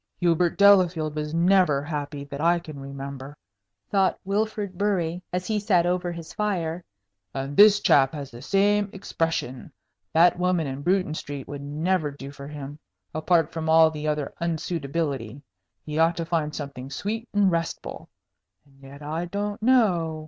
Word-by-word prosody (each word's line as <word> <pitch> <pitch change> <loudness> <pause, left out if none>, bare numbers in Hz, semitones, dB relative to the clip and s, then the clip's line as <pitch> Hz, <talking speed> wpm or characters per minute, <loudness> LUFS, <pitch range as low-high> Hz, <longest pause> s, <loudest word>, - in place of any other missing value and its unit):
"Hubert 175 -1 +2
Delafield 180 -6 +4
was 150 0 -3
never 170 -5 +3
happy, 145 -2 -4
that 140 0 -7
I 170 +2 +4
can 155 -4 -9
remember," 140 +1 -8 0.5
thought 195 -2 +2
Wilfrid 205 -1 -2
Bury, 180 -3 -1
as 180 0 -2
he 215 +1 0
sat 185 -4 +2
over 180 0 0
his 165 -2 -8
fire, 180 -5 -2 0.5
"and 135 +1 -4
this 205 0 +8
chap 135 -6 +4
has 140 -2 -6
the 120 0 -11
same 205 +5 +2
expression. 165 -9 -3 0.4
That 175 +2 +4
woman 180 -2 +1
in 135 0 -5
Bruton 180 -1 +1
Street 145 -3 -6
would 145 -1 -6
never 155 +3 -1
do 140 -1 -9
for 140 -1 -10
him 145 0 -8 0.3
apart 165 +1 +2
from 160 -1 -3
all 160 0 +6
the 155 0 -5
other 150 -2 -2
unsuitability. 150 -6 -2 0.5
He 150 +1 -3
ought 165 +1 +3
to 165 - -2
find 160 -3 -1
something 140 -3 -6
sweet 225 - -4
and 205 -2 +3
restful. 165 -1 -4 0.6
And 135 -1 -24
yet 140 +2 -12
I 160 +4 -3
don't 205 +4 -4
know. 185 -10 +2
165 Hz, 160 wpm, -25 LUFS, 145-185 Hz, 0.6 s, this